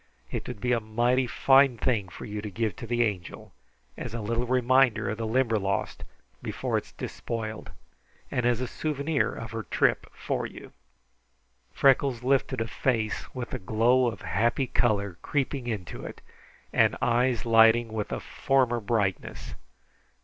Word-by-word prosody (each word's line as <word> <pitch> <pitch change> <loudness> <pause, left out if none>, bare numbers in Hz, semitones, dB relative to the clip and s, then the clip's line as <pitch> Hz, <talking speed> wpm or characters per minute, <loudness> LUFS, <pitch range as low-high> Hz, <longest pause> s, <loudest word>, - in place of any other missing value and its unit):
It - - -4
would 125 -4 -6
be 125 +2 -1
a 120 - +3
mighty 120 +4 +1
fine 135 0 +4
thing 110 -4 0
for - - -9
you 105 0 -5
to 105 - -5
give 110 -1 -2
to 115 - -7
the 120 +1 +2
Angel 95 -6 -4 0.4
as 115 - -6
a - - -3
little 115 +3 -1
reminder 130 -2 +3
of 110 - -5
the 115 - -2
Limberlost 110 -5 0 0.4
before - - -3
it - - -15
is - - -17
despoiled, 110 -2 -5 0.6
and 125 - 0
as 120 0 +2
a 125 - -2
souvenir 150 +2 -1
of 115 - -7
her 115 0 -3
trip 105 - +1
for - - -3
you." - - -12 1.0
Freckles 135 -3 +3
lifted 130 -2 +1
a 115 - -1
face 115 -4 -1
with 125 -2 -5
a - - -2
glow 115 +6 +3
of 115 - -4
happy 120 +6 +1
color 100 -7 0
creeping 135 -3 -2
into 100 - -5
it - - -8 0.5
and - - +3
eyes 120 -1 +1
lighting 115 0 +5
with 105 -2 -3
a - - -2
former 130 -3 +1
brightness. 105 -4 -2
115 Hz, 160 wpm, -27 LUFS, 110-125 Hz, 1.0 s, lighting